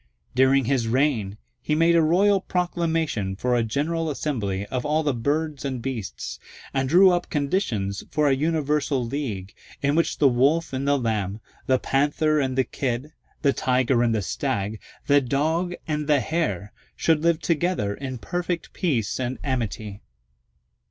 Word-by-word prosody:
During 130 +1 +4
his 125 -2 +1
reign 115 -5 +1 0.2
he 150 +4 0
made 165 +2 +4
a 165 - +5
royal 190 +5 +3
proclamation 165 - -1
for 125 +5 0
a 120 - +3
general 155 +8 -1
assembly 105 -10 -2
of 125 +3 -3
all 155 +2 +1
the 145 -2 +1
birds 145 +4 -1
and 135 -3 -3
beasts, 115 -5 -5 0.3
and 135 -1 0
drew 185 +4 +7
up 175 0 -1
conditions 130 - -1
for 150 0 +1
a 140 - +4
universal 150 -3 0
league, 115 -8 -4 0.3
in 140 0 +1
which 165 +2 +1
the 145 - +5
Wolf 140 +6 +2
and 135 +1 -2
the 145 0 +4
Lamb, 110 -5 -2 0.3
the 130 - +4
Panther 150 +3 +1
and 130 -2 -1
the 130 - +4
Kid, 130 +3 -3 0.3
the 140 -2 +4
Tiger 125 -1 +2
and 115 -2 +2
the 105 - -1
Stag, 100 +4 -2 0.3
the 145 0 +5
Dog 160 +7 0
and 150 -1 -2
the 150 -2 +4
Hare, 115 - -2 0.2
should 160 -2 +2
live 170 -1 +2
together 170 - 0
in 130 +2 -5
perfect 175 +5 -3
peace 125 - -1
and 130 0 -2
amity. 110 -6 -3
140 Hz, 160 wpm, -24 LUFS, 120-155 Hz, 0.3 s, drew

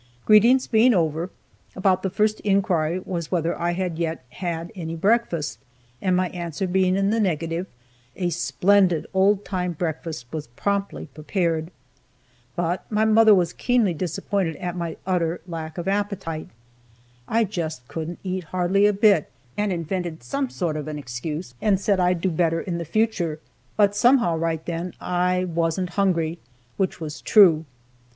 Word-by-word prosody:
Greetings 235 +5 +6
being 230 +1 +4
over, 165 0 0 0.5
about 185 -1 +2
the 190 - -1
first 210 +3 +1
inquiry 185 -5 +1
was 170 -4 -4
whether 170 -2 0
I 175 0 -1
had 180 -2 -3
yet 165 -4 -2
had 170 +1 -4
any 165 -3 -5
breakfast, 195 -4 0 0.4
and 185 -1 +2
my 185 0 +1
answer 170 0 -4
being 185 0 +2
in 195 +1 +1
the 225 - +1
negative, 165 -2 -1 0.5
a 175 -2 -1
splendid 180 0 +2
old 195 +1 +3
time 180 -2 -2
breakfast 160 -4 -4
was 155 -2 -4
promptly 200 +4 -2
prepared. 165 0 -1 0.9
But 175 +4 -2
my 215 +1 +2
mother 220 -1 +6
was 175 -3 +1
keenly 240 -7 +2
disappointed 180 +1 -2
at 175 -1 -4
my 170 -2 -4
utter 175 -2 0
lack 160 -2 -6
of 175 - -4
appetite. 195 -5 -2 0.8
I 230 +1 +2
just 160 - -4
couldn't 165 +4 -5
eat 185 -2 -3
hardly 185 +4 +2
a 210 - +2
bit, 200 -5 +4 0.3
and 205 -1 0
invented 170 -1 -3
some 275 -2 -2
sort 170 -8 -2
of 150 -1 -5
an 155 -1 -4
excuse, 145 +3 -5
and 200 -3 +3
said 200 -1 +1
I'd 180 -1 +2
do 190 - +1
better 165 0 +1
in 170 -2 -3
the 170 - -4
future, 175 -5 0 0.4
but, 205 -1 +4
somehow, 235 -6 +4
right 160 -1 -2
then, 170 +1 -4
I 180 0 0
wasn't 170 +1 -1
hungry, 170 -4 0 0.4
which 190 -2 -1
was 155 -2 -6
true. 170 -7 +6
180 Hz, 160 wpm, -24 LUFS, 165-195 Hz, 0.9 s, Greetings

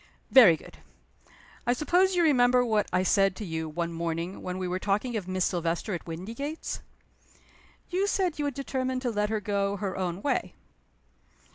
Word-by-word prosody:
"Very 210 -12 +8
good. - - -15 0.9
I 245 - +4
suppose 360 +8 +2
you 350 - +3
remember 250 -4 +4
what 215 -3 +1
I 185 +1 +2
said 195 0 +3
to 210 - -6
you, 160 -2 -3
one 170 +2 -3
morning, 170 +2 -3
when 180 0 -4
we 185 -1 -3
were 180 +1 -2
talking 210 +5 -1
of 200 -4 -3
Miss 185 -1 0
Silvester 175 +3 -1
at 175 - -5
Windygates?" 230 - -5 1.1
"You 380 +3 +1
said 365 -6 0
you 295 - 0
had 285 -3 -2
determined 260 -1 -2
to 245 - 0
let 210 -1 0
her 220 -1 0
go 200 0 -1
her 195 -2 -3
own 185 +1 -3
way." 250 -10 -1
205 Hz, 175 wpm, -28 LUFS, 180-255 Hz, 1.1 s, Very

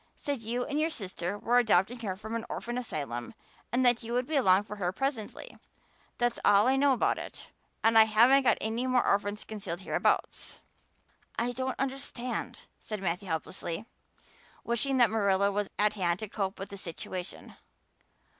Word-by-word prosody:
Said 285 -4 -3
you 240 +3 -2
and 295 +1 -2
your 315 +1 +2
sister 190 - -4
were 240 +4 +3
adopting 220 +1 +2
her 200 -5 -3
from 220 +3 -8
an 230 - -2
orphan 240 +1 -4
asylum 145 - -4 0.4
and 255 +1 +2
that 245 -1 +4
you 230 0 -5
would 250 +1 +1
be 310 - -3
along 195 -7 +5
for 210 0 -8
her 180 -3 -1
presently. 250 0 -4 0.6
That's 240 -1 0
all 205 +2 +5
I 265 - +4
know 275 0 +4
about 245 - +1
it - - -9 0.3
and 225 0 +4
I 220 -1 +9
haven't 235 +6 +6
got 260 - +3
any 230 +4 -2
more 255 -1 +3
orphans 205 +1 0
concealed 195 -5 -6
hereabouts." - - -1 0.8
"I 240 +2 0
don't 260 +1 -3
understand," 265 -2 -3 0.2
said 215 -1 -5
Matthew 180 +2 -2
helplessly, 165 +3 -4 0.8
wishing 260 +3 0
that 240 -4 +5
Marilla 200 -2 +2
was 205 0 -1
at 210 0 +3
hand 175 -4 0
to 215 - -3
cope 195 -1 -3
with 195 - -6
the 200 - -7
situation. 180 +1 -6
220 Hz, 175 wpm, -30 LUFS, 195-245 Hz, 0.8 s, I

